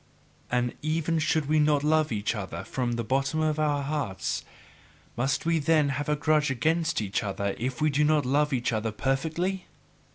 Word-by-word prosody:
And 125 -1 0
even 160 +1 0
should 155 -1 +1
we 155 +1 +3
not 150 -1 +3
love 155 -1 +2
each 105 0 -1
other 100 -5 -5
from 125 -2 -2
the 120 0 -2
bottom 135 +6 0
of 155 -1 +1
our 145 -2 +1
hearts, 140 -9 -2 0.7
must 130 +5 0
we 165 -1 +2
then 155 -1 +3
have 140 +2 -2
a 150 - +3
grudge 150 0 +2
against 160 +4 +1
each 100 -2 -1
other 100 -1 -2
if 130 +3 -2
we 155 - +3
do 145 +2 +2
not 150 -2 +3
love 145 +3 +2
each 125 -2 0
other 110 0 -1
perfectly? 160 - -1
145 Hz, 185 wpm, -27 LUFS, 125-155 Hz, 0.7 s, we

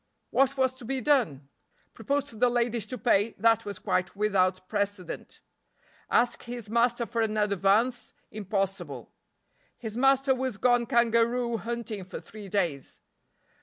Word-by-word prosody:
What 275 +1 +2
was 260 -1 +2
to 255 - -12
be 265 +2 -2
done? 235 - +1 0.5
Propose 280 +6 -1
to 275 -4 -14
the 245 +3 +3
ladies 240 -2 0
to 255 - -5
pay, 225 -3 +2
that 225 +1 +3
was 200 -2 -5
quite 185 +2 -1
without 185 -3 +1
precedent. 205 -3 -4 0.7
Ask 240 0 +2
his 240 -3 -7
master 235 +1 +2
for 230 0 -2
an 215 -1 0
advance, 210 +4 +1 0.2
impossible. 195 - -3 0.7
His 220 -2 -6
master 270 +1 +4
was 260 -4 -3
gone 245 0 +2
kangaroo 235 -1 +2
hunting 230 -3 -5
for 185 - -8
three 210 -2 -11
days. 170 -9 -2
230 Hz, 140 wpm, -28 LUFS, 200-245 Hz, 0.7 s, master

